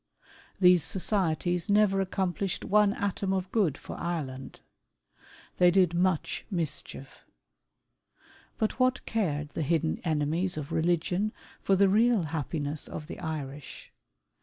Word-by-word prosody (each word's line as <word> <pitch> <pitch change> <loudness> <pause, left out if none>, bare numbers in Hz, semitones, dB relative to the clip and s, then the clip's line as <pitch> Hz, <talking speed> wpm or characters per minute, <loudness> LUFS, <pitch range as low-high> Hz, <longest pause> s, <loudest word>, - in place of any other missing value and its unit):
These 180 -2 +6
societies 180 0 0
never 205 -1 +4
accomplished 190 0 -2
one 210 0 +4
atom 200 -1 -2
of 190 -1 -2
good 185 - +1
for - - -9
Ireland. 135 -6 -5 1.0
They 180 - +6
did 180 -2 +3
much 175 -2 0
mischief. 160 -6 -5 1.4
But 220 +4 -1
what 255 0 +2
cared 150 -10 -1
the 155 - -4
hidden 160 +1 0
enemies 160 +2 0
of 150 +1 -5
religion 175 +5 0 0.3
for 195 - +2
the 200 +1 +4
real 220 +1 +3
happiness 150 -1 -3
of 150 - -7
the 165 - -8
Irish 150 -4 -6
175 Hz, 120 wpm, -28 LUFS, 155-195 Hz, 1.4 s, These